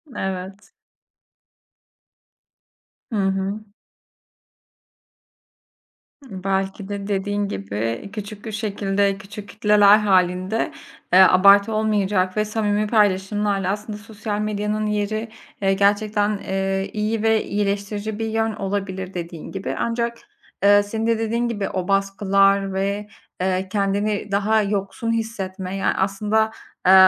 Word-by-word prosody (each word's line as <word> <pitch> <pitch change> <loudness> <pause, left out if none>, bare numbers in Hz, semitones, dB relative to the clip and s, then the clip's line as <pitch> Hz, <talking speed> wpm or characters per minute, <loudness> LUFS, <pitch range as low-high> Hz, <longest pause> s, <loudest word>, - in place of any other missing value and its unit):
Evet. 190 +1 -5 2.4
Hı - - -2
hı. 195 +1 0 2.6
Hı, 190 -7 -9
belki 195 0 -2
de, 200 -1 -4
dediğin 205 0 -1
gibi, 110 - -4
küçük 205 0 -7
bir 220 - -4
şekilde, 200 -2 0
küçük 200 +1 -10
kitleler 210 -1 +5
hâlinde, 185 0 +1 0.4
eee, 185 - +8
abartı 200 +3 +6
olmayacak 205 -3 +1
ve 215 - +2
samimi 210 -1 0
paylaşımlarla 205 -2 +1
aslında 210 +1 -5
sosyal 210 0 -5
medyanın 210 0 -1
yeri, 210 +2 -1 0.3
eee, 195 0 +3
gerçekten, 205 +1 +2
eee, 195 0 -2
iyi 215 +1 -1
ve 220 -1 +3
iyileştirici 205 +1 -2
bir 225 - -1
yön 225 0 0
olabilir, 195 -2 -3
dediğin 170 -2 -6
gibi, 195 0 -4
ancak, 235 0 -1 0.5
ııı, 205 0 +6
senin 220 +2 -3
de, 230 -1 +2
dediğin 230 +2 0
gibi, 205 -4 -2
o 185 -1 -3
baskılar 195 0 +2
ve, 200 +2 -2 0.4
ııı, 185 0 0
kendini 200 +1 -1
daha 215 +2 +2
yoksun 205 +3 -2
hissetme 195 -5 -3
ya 195 - +1
aslında, 210 +3 +1 0.3
eee, 185 - +7
205 Hz, 115 wpm, -22 LUFS, 195-215 Hz, 2.6 s, eee